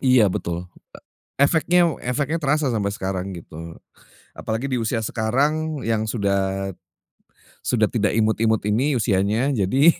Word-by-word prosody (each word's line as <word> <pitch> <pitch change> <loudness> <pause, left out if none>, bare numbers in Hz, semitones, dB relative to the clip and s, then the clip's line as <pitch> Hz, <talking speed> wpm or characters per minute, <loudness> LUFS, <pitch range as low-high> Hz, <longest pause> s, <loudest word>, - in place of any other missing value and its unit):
Iya, 130 -5 +5
betul. 85 +1 -4 0.7
E - - +8
efeknya 170 +3 +3
efeknya 140 +6 -1
terasa 150 -1 +1
sampai 100 -4 -1
sekarang, 95 -1 -3
gitu. 85 0 -9 0.6
Apalagi 110 +4 -3
di 130 - 0
usia 115 0 -1
sekarang 145 +8 0
yang 110 -1 +1
sudah 95 -2 -1 0.9
sudah 110 -4 +2
tidak 105 -3 0
imut-imut 110 0 +2
ini 130 +7 +2
usianya. 105 +6 +1
Jadi 130 - +4
110 Hz, 125 wpm, -22 LUFS, 100-135 Hz, 0.9 s, E